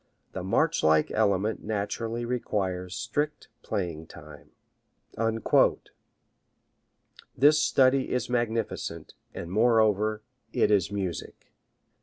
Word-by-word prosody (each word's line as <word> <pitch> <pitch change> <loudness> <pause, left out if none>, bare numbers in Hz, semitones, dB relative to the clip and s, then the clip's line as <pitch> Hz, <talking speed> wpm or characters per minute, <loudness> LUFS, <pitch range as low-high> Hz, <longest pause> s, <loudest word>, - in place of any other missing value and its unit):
The - - -5
march - - +1
like 80 0 +3
element 100 +2 +1
naturally 110 +3 -3
requires 95 -7 -2
strict 150 0 -3
playing 90 -7 -3
in 80 - -12
time. 75 -3 -14 2.9
This 150 +4 +5
study 135 -2 +3
is 125 - -1
magnificent, 115 -2 -3 0.2
and 85 - -6
moreover 110 -1 +2 0.3
it - - +2
is 100 -1 +2
music. 95 -6 -5
105 Hz, 95 wpm, -27 LUFS, 95-120 Hz, 2.9 s, This